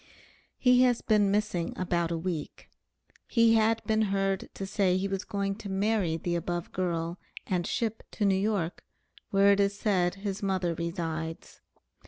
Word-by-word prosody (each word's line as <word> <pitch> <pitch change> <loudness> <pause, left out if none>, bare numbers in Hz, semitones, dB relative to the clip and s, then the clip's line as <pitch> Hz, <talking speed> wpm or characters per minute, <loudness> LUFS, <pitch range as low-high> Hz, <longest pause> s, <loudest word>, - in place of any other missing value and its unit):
He 250 -1 +5
has 245 -2 +3
been 210 -2 +3
missing 200 -4 0
about 175 -2 0
a 170 - -1
week; 165 -3 -5 0.6
he 230 -1 +4
had 225 0 +3
been 220 0 +1
heard 195 -2 0
to 195 - -4
say 190 -2 +1
he 190 +1 -1
was 195 0 -3
going 200 -1 -2
to 205 - -8
marry 195 -4 +1
the 175 +1 -3
above 175 0 -3
girl 170 -1 -2 0.3
and 180 -2 -1
ship 225 -2 -2
to 210 - 0
New 195 - +4
York, 190 -3 -1 0.5
where 200 0 +5
it 200 - +3
is 200 0 +2
said 185 -4 +1
his 195 0 -4
mother 190 -3 0
resides. 165 -1 -5
195 Hz, 165 wpm, -29 LUFS, 175-210 Hz, 0.6 s, He